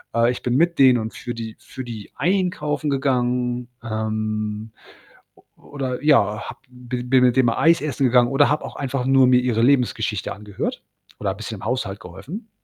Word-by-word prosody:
Äh, 115 +1 +4
ich 125 - -6
bin 125 0 -1
mit 170 0 +2
denen 130 -2 +7
und 110 -1 -4
für 120 0 -6
die 110 -1 -6
für 130 - -9
die 115 -4 -8
einkaufen 155 -5 0
gegangen, 125 -3 0 0.2
ähm, 110 -1 -3 0.7
o - - -23 0.3
oder, 130 -3 -4
ja, 105 -8 +3
habe - - -9
b 125 0 -6
bin 125 +1 +3
mit 125 -1 +3
denen 130 - +5
mal 115 - 0
Eis 165 -1 +4
essen 145 -2 -1
gegangen 120 -1 +4
oder 140 +1 +4
habe 150 +1 0
auch - - -7
einfach 135 -2 -2
nur 135 0 +5
mir 125 0 +5
ihre 120 -3 0
Lebensgeschichte 120 -5 +1
angehört 105 0 -5 0.4
oder 100 -2 -2
bisschen 110 +2 -6
im 100 - -8
Haushalt 115 -5 -2
geholfen. 130 - -9
125 Hz, 185 wpm, -22 LUFS, 110-135 Hz, 0.7 s, denen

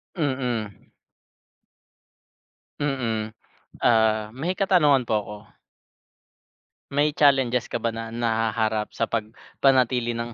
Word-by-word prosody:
Mhm. 125 - -2 2.1
Mm, 115 -7 -2 0.5
ah, 110 -2 +3
may 160 +8 -2
katanungan 150 -10 +3
po - - -3
ako. 105 +1 -9 1.5
May 145 +2 +1
challenges 135 -5 +2
ka - - -2
ba 115 -1 -2
na 115 0 -6
nahaharap 110 -2 -1
sa - - 0
pagpanatili 120 +2 0
ng 115 0 -5
120 Hz, 95 wpm, -24 LUFS, 110-135 Hz, 2.1 s, ah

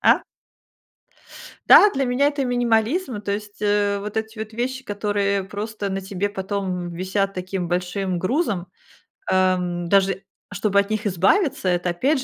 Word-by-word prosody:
А? - - +5 1.5
Да, 415 - +9
для 270 -7 -1
меня 265 +4 +3
это 285 -2 -2
минимализм, 245 - +1
то 205 - -5
есть, 205 0 -6
э, 205 -1 +1
вот 210 +2 -6
эти 220 0 -3
вот 220 0 -6
вещи, 260 +3 -2
которые 205 -2 -1
просто 205 +1 -5
на 195 0 -2
тебе 195 +1 -3
потом, 200 0 -3 0.2
м, - - -6
висят 195 +2 -1
таким 185 -1 -3
большим 180 +1 -1
грузом, 195 - -1 0.6
эм, 180 -2 +1
даже 195 +1 +2 0.3
чтобы 200 0 +1
от 200 0 0
них 215 0 -2
избавиться, 195 - +2
это 175 0 0
опять 260 - +1
205 Hz, 150 wpm, -22 LUFS, 190-220 Hz, 1.5 s, Да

